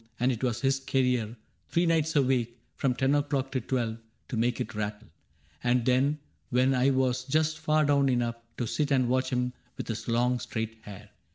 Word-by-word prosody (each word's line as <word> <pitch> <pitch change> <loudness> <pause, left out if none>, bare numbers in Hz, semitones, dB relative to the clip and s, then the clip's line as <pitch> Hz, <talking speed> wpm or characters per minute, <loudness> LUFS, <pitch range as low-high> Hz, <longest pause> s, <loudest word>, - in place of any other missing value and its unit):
And 125 +2 +3
it 120 0 -4
was 120 -2 0
his 135 0 +2
career 125 -4 0
— - - -42
three 170 +1 +2
nights 160 -2 +1
a 145 - +5
week. 120 -2 0 0.2
From 130 -2 0
ten 135 +2 +2
o*clock 140 -2 0
till 130 -1 -1
twelve 115 -2 -2
— - - -43
to - - -3
make 120 +2 +1
it - - -3
rattle; 105 +1 -4 0.5
And 120 -1 +2
then, 130 +4 +3 0.3
when 130 +2 +3
I 130 +1 +3
was 130 -1 +1
just 155 +3 0
far 155 0 +2
down 140 -1 +3
enough 120 -2 0 0.2
To 120 - -1
sit 145 +5 -1
and 130 -3 +3
watch 130 +1 +1
him 125 0 -1 0.2
with - - -6
his 115 0 -4
long 120 +1 +2
straight 110 0 -4
hair. 105 -3 -11
125 Hz, 205 wpm, -28 LUFS, 120-135 Hz, 0.5 s, a